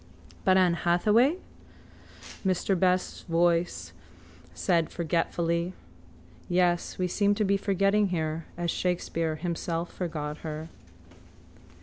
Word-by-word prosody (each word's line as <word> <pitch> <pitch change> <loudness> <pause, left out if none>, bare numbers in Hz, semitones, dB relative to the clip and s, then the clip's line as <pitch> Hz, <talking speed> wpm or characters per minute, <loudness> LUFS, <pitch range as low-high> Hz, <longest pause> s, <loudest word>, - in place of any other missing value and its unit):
—But 185 0 +4
Ann 180 -2 +4
Hathaway? 210 - +3 1.1
Mr 190 0 +1
Best's 185 0 +1
quiet - - -11
voice 170 - +1 0.6
said 170 - +1
forgetfully. 170 +1 -1 0.8
Yes, 175 -1 +1
we 185 - 0
seem 205 +3 +2
to 215 - 0
be 200 +1 +3
forgetting 200 +1 +2
her 160 -2 -2
as 170 -1 -1
Shakespeare 165 -3 -1
himself 170 +1 -3
forgot 155 -4 -4
her. 155 0 -6
175 Hz, 105 wpm, -28 LUFS, 165-185 Hz, 1.1 s, But